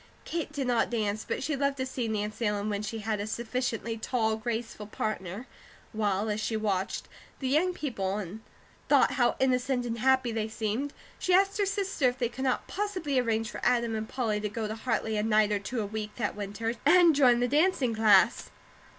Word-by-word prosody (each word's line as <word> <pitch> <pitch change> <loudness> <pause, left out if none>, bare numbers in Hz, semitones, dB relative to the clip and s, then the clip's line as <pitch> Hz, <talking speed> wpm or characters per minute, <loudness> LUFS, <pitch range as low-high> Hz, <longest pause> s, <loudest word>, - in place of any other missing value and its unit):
Kate 330 -3 -3
did 285 -3 -2
not 245 -2 +2
dance, 215 -2 -1
but - - -2
she 300 +1 -1
loved 280 0 0
to 260 - -1
see 255 -2 -3
Nancy 215 +1 -2
Ellen 210 0 -1
when 205 -1 -1
she 220 +1 -4
had 215 -2 0
a 205 - -3
sufficiently 235 0 -2
tall, 220 -2 0
graceful 220 -1 -4
partner; 210 0 -4 0.5
while, 210 -1 0
as 210 0 -1
she 220 0 -1
watched 195 -3 -1 0.3
the 265 - -3
young 310 +7 +3
people 205 - -3
and 210 +2 -6 0.5
thought - - +5
how 245 -3 +2
innocent 255 -1 +1
and 235 -1 -3
happy 260 0 +3
they 220 -1 -1
seemed, 220 +5 -2 0.3
she 365 - +3
asked 390 +2 +3
her 400 - +2
sister 390 -9 +1
if 245 - -7
they 240 -3 0
could 265 +2 -5
not 255 - 0
possibly 365 -9 -1
arrange 225 -2 0
for - - -7
Adam 235 -2 +2
and 220 0 -3
Polly 225 -5 -1
to 210 - -2
go 215 +1 -3
to 215 - -3
Hartley 225 -1 -1
a - - +1
night 215 -1 +3
or 205 - +1
two 225 +4 -3
a - - -2
week 210 0 -5
that - - -2
winter, 205 +3 -3
and 340 +2 +6
join 250 -4 +5
the 245 - +2
dancing 290 -3 +2
class. 215 -3 +4
230 Hz, 205 wpm, -29 LUFS, 215-265 Hz, 0.5 s, and